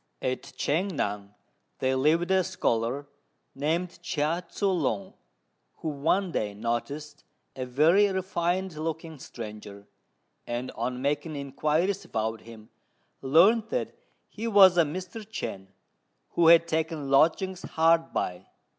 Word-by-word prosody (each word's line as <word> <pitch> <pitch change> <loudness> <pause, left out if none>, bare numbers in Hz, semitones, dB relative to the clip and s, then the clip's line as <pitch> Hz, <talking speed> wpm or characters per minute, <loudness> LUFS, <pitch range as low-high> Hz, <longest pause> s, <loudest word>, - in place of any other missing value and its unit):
At 130 0 -1 0.2
Ch'ang 180 +6 0
ngan 100 0 -3 0.4
there 130 0 0
lived 160 +7 +2
a 190 -1 +4
scholar 135 -7 -1 0.5
named 170 +5 -2
Chia 165 +1 -1
Tzŭ 190 -4 0
lung, 105 -8 -2 0.6
who 160 - -4
one 165 +6 0
day 105 -9 -2
noticed 140 +7 -4 0.3
a 130 -1 -4
very 160 +11 +4
refined 185 -1 -1
looking 160 0 -5
stranger; 105 -4 -9 0.6
and, 120 +2 -3
on 125 +1 -4
making 145 +2 -1
inquiries 155 +7 -1
about 110 0 -3
him, 110 -1 -13 0.5
learnt 185 - +4
that - - -2 0.3
he 225 +2 -5
was 195 -4 +7
a 170 - +5
Mr. 180 +7 -6
Chên, 200 - -6 0.6
who 170 - +3
had 170 0 +7
taken 160 -3 -2
lodgings 175 +6 +3
hard 165 +1 +2
by. 90 -1 -3
155 Hz, 125 wpm, -27 LUFS, 130-180 Hz, 0.6 s, was